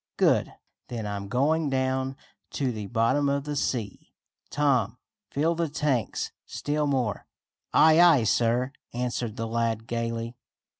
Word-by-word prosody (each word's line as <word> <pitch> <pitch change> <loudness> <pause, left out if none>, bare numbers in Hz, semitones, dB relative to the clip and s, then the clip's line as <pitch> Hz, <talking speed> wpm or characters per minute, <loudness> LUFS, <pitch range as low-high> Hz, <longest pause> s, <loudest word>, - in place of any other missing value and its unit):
"Good! - - +3 0.4
Then 115 -3 -5
I'm 100 -1 -4
going 145 +7 +1
down 130 0 -1 0.4
to 135 -3 0
the 105 -3 -5
bottom 120 +6 +2
of 140 0 0
the 145 0 -4
sea! 120 -7 -3 0.3
Tom, 125 -6 +1 0.3
fill 155 +4 +1
the 170 -1 -1
tanks 140 -6 -1 0.2
still 150 0 -1
more. 125 -7 -1 0.4
"Aye, 160 +1 +6
aye, 165 -8 +6
sir," 120 +4 +2 0.2
answered 120 -2 -2
the 115 - -3
lad 115 -1 -1
gaily. 115 0 -3
125 Hz, 135 wpm, -27 LUFS, 115-145 Hz, 0.4 s, Aye